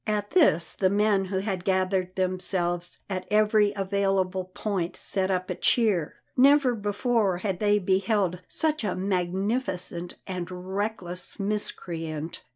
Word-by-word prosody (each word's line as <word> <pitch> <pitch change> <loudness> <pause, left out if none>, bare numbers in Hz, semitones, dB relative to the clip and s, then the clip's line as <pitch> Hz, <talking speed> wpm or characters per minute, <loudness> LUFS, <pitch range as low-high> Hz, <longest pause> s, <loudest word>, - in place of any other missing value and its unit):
At 210 -1 -1
this 240 - +4
the 190 - +1
men 205 -1 +2
who 190 0 -3
had 190 -2 -3
gathered 185 -1 0
themselves 180 -1 +2
at 185 -2 -4
every 210 -1 +3
available 195 -1 0
point 185 -2 -3
set 190 -1 -1
up 185 -1 -1
a - - 0
cheer. 205 -10 +1 0.2
Never 275 0 +5
before 205 -2 0
had 185 -1 -3
they 210 -1 +3
beheld 190 -1 0
such 310 -4 0
a 205 -4 -1
magnificent 185 -1 -2
and 180 -2 -5
reckless 185 0 -1
miscreant. 165 -6 -4
190 Hz, 130 wpm, -26 LUFS, 180-210 Hz, 0.2 s, Never